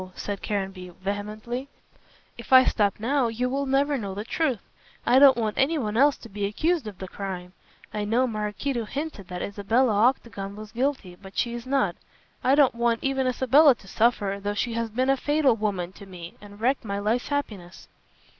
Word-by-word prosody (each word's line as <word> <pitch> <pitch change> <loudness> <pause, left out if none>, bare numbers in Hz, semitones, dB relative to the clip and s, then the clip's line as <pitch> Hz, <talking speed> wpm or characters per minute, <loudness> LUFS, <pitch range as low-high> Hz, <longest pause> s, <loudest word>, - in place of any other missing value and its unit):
said 200 -1 -5
Caranby, 190 -3 -4
vehemently; 215 +6 -4 0.7
"if 235 - -12
I 260 0 +9
stop 205 -2 +1
now 255 +3 +1
you 230 +2 -1
will 275 +1 -1
never 275 +1 +2
know 200 -3 -5
the 205 - -4
truth. 255 -3 -1 0.4
I 250 +2 +5
don't 275 -3 +7
want 220 -3 -1
anyone 270 -7 +1
else 280 +4 +4
to - - -12
be 205 -1 -3
accused 310 - 0
of 205 -3 -8
the 190 - -7
crime. 185 -2 -6 0.4
I 210 - -2
know 230 +5 +2
Maraquito 225 +2 -2
hinted 275 - -5
that 180 -1 -5
Isabella 215 +4 +1
Octagon 210 -3 0
was 215 0 -9
guilty, 245 -7 -2
but 195 -1 -12
she 235 - 0
is 240 +1 -7
not. 275 0 +1 0.5
I 265 +2 +4
don't 285 -3 +5
want 235 -1 0
even 270 -1 0
Isabella 265 +3 +5
to 195 - -18
suffer, 205 -2 +1
though 205 +1 -2
she 235 +3 -1
has 230 0 -2
been 255 +5 +1
a - - +3
fatal 290 -2 +2
woman 200 -5 -2
to 200 +1 -13
me 175 -2 -9
and 205 0 -13
wrecked 255 +4 +1
my 200 -2 -3
life's 220 +5 0
happiness." 210 -12 -4
230 Hz, 190 wpm, -25 LUFS, 205-265 Hz, 0.7 s, I